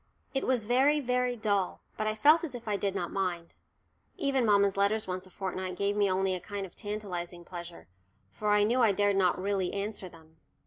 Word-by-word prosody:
It 270 Hz, -, -1 dB
was 255 Hz, -4 st, +2 dB
very, 265 Hz, +7 st, +3 dB
very 250 Hz, -2 st, 0 dB
dull, 205 Hz, -4 st, 0 dB, 0.2 s
but 215 Hz, -, -2 dB
I 215 Hz, -, 0 dB
felt 305 Hz, +9 st, +5 dB
as 290 Hz, -7 st, -4 dB
if 235 Hz, -2 st, -9 dB
I 210 Hz, -, +1 dB
did 200 Hz, -1 st, -1 dB
not -, -, -2 dB
mind. 180 Hz, -3 st, -2 dB, 0.6 s
Even 275 Hz, -, +1 dB
mamma's 200 Hz, -1 st, +4 dB
letters 205 Hz, +2 st, +2 dB
once 185 Hz, 0 st, -4 dB
a -, -, -16 dB
fortnight 185 Hz, -1 st, -4 dB
gave 200 Hz, +2 st, 0 dB
me 205 Hz, -1 st, +3 dB
only 190 Hz, 0 st, +1 dB
a 185 Hz, -, -2 dB
kind 200 Hz, +2 st, -5 dB
of 180 Hz, -, -14 dB
tantalising 180 Hz, -5 st, -5 dB
pleasure, 175 Hz, -1 st, -9 dB, 0.4 s
for 210 Hz, -, -3 dB
I 210 Hz, 0 st, +5 dB
knew 240 Hz, +4 st, +2 dB
I 220 Hz, -4 st, +5 dB
dared 205 Hz, 0 st, +2 dB
not 185 Hz, -2 st, +3 dB
really 195 Hz, -1 st, 0 dB
answer 200 Hz, -2 st, -4 dB
them. 160 Hz, -1 st, -18 dB
200 Hz, 210 wpm, -30 LUFS, 185-220 Hz, 0.6 s, felt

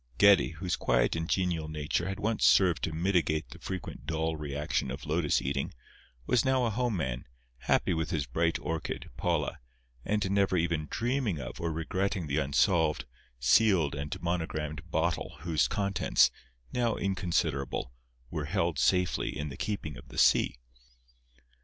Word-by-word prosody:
Geddie, 100 Hz, -4 st, +6 dB
whose 90 Hz, +1 st, -2 dB
quiet -, -, +2 dB
and 80 Hz, 0 st, -3 dB
genial 85 Hz, -4 st, 0 dB
nature 80 Hz, +4 st, -2 dB
had 95 Hz, +1 st, -4 dB
once 110 Hz, +1 st, 0 dB
served 90 Hz, -5 st, +5 dB
to 80 Hz, -, -3 dB
mitigate 80 Hz, -2 st, 0 dB
the -, -, -11 dB
frequent 95 Hz, -2 st, -6 dB
dull 80 Hz, 0 st, -1 dB
reaction 75 Hz, -1 st, -2 dB
of 70 Hz, +3 st, -6 dB
lotus 75 Hz, 0 st, +1 dB
eating, 70 Hz, 0 st, -2 dB, 0.5 s
was 125 Hz, -, +3 dB
now 130 Hz, -2 st, +2 dB
a 115 Hz, -, 0 dB
home 120 Hz, -1 st, 0 dB
man, 65 Hz, -6 st, -3 dB, 0.3 s
happy -, -, +2 dB
with 80 Hz, -1 st, -1 dB
his 80 Hz, -6 st, -1 dB
bright 85 Hz, +7 st, 0 dB
orchid, 80 Hz, -1 st, -4 dB
Paula, -, -, -1 dB, 0.4 s
and 105 Hz, 0 st, 0 dB
never 100 Hz, -2 st, +2 dB
even 80 Hz, -2 st, 0 dB
dreaming 120 Hz, -, -1 dB
of -, -, -7 dB
or 85 Hz, -1 st, -1 dB
regretting 90 Hz, +3 st, -1 dB
the 70 Hz, +1 st, 0 dB
unsolved, 80 Hz, +3 st, +2 dB, 0.3 s
sealed 80 Hz, -, +4 dB
and 70 Hz, +1 st, -4 dB
monogramed 80 Hz, -3 st, -2 dB
Bottle 80 Hz, 0 st, -1 dB
whose 85 Hz, -3 st, +2 dB
contents, 100 Hz, -2 st, +2 dB, 0.4 s
now 120 Hz, -2 st, +1 dB
inconsiderable, 85 Hz, -10 st, -1 dB, 0.4 s
were 75 Hz, -, -2 dB
held 85 Hz, -2 st, 0 dB
safely 90 Hz, -1 st, +1 dB
in 75 Hz, 0 st, -3 dB
the 70 Hz, -, -7 dB
keeping 90 Hz, -9 st, -4 dB
of -, -, -13 dB
the -, -, -11 dB
sea. -, -, +4 dB
80 Hz, 155 wpm, -30 LUFS, 75-95 Hz, 0.5 s, Geddie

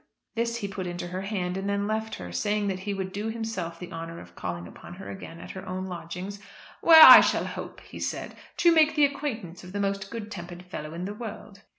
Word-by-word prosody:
This 235 Hz, 0 st, -1 dB
he 205 Hz, -4 st, -3 dB
put 190 Hz, -2 st, -5 dB
into 175 Hz, 0 st, -5 dB
her 185 Hz, +1 st, -4 dB
hand, 190 Hz, -2 st, -2 dB
and 195 Hz, +1 st, -3 dB
then 200 Hz, 0 st, 0 dB
left 220 Hz, +1 st, -2 dB
her, 90 Hz, 0 st, -8 dB
saying 205 Hz, -, 0 dB
that 190 Hz, -1 st, -2 dB
he 200 Hz, +2 st, -3 dB
would 190 Hz, -1 st, -4 dB
do 210 Hz, +2 st, -3 dB
himself 220 Hz, -7 st, -4 dB
the 180 Hz, -, -8 dB
honour 165 Hz, +1 st, -6 dB
of 90 Hz, 0 st, -13 dB
calling 85 Hz, -1 st, -5 dB
upon 175 Hz, -, -11 dB
her 195 Hz, -, -8 dB
again 170 Hz, -3 st, -9 dB
at -, -, -8 dB
her 190 Hz, -, -8 dB
own 185 Hz, +1 st, -3 dB
lodgings, 180 Hz, +2 st, -6 dB, 0.4 s
"where 320 Hz, -1 st, +10 dB
I -, -, +13 dB
shall -, -, +1 dB
hope," -, -, -7 dB
he -, -, -11 dB
said, -, -, -4 dB, 0.2 s
"to 340 Hz, -1 st, +5 dB
make 315 Hz, -1 st, +5 dB
the 300 Hz, -2 st, +6 dB
acquaintance 230 Hz, -, -4 dB
of 180 Hz, +1 st, -11 dB
the 205 Hz, -, -2 dB
most 195 Hz, -1 st, -1 dB
good 220 Hz, -1 st, -6 dB
tempered 175 Hz, -2 st, -8 dB
fellow 155 Hz, -3 st, -7 dB
in 175 Hz, +2 st, -4 dB
the 205 Hz, -, -4 dB
world." 210 Hz, -2 st, -8 dB
195 Hz, 235 wpm, -27 LUFS, 175-215 Hz, 0.4 s, I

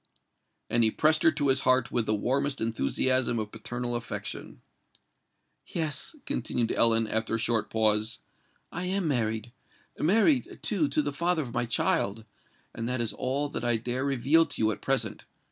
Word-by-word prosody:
And 120 Hz, 0 st, +2 dB
he 110 Hz, -, +6 dB
pressed 155 Hz, +6 st, +2 dB
her -, -, +6 dB
to 145 Hz, -2 st, 0 dB
his 135 Hz, 0 st, +4 dB
heart 130 Hz, -2 st, +2 dB
with 115 Hz, -2 st, 0 dB
the 110 Hz, -, +2 dB
warmest 135 Hz, +6 st, -1 dB
enthusiasm 115 Hz, -, +1 dB
of 105 Hz, -1 st, -3 dB
paternal 120 Hz, +2 st, -4 dB
affection. 120 Hz, -1 st, -6 dB, 1.1 s
"Yes," 160 Hz, -, -3 dB
continued 120 Hz, -, -1 dB
Ellen, 115 Hz, -1 st, +4 dB
after 110 Hz, +1 st, -1 dB
a -, -, 0 dB
short 115 Hz, -1 st, 0 dB
pause, 110 Hz, 0 st, +1 dB, 0.5 s
"I 180 Hz, +1 st, -4 dB
am 185 Hz, -1 st, 0 dB
married—married, 135 Hz, -, -1 dB
too, 185 Hz, -9 st, +1 dB
to 145 Hz, +2 st, +1 dB
the 145 Hz, 0 st, -3 dB
father 170 Hz, +1 st, 0 dB
of 120 Hz, -, -8 dB
my 120 Hz, 0 st, -1 dB
child;—and 110 Hz, +1 st, -3 dB
that 125 Hz, 0 st, -1 dB
is 115 Hz, -3 st, 0 dB
all 140 Hz, +3 st, -1 dB
that 130 Hz, -, -5 dB
I 120 Hz, -1 st, +2 dB
dare 125 Hz, +3 st, -2 dB
reveal 140 Hz, +4 st, +3 dB
to -, -, -4 dB
you 110 Hz, -, +3 dB
at 105 Hz, -, -6 dB
present! -, -, -1 dB
120 Hz, 160 wpm, -28 LUFS, 115-145 Hz, 1.1 s, he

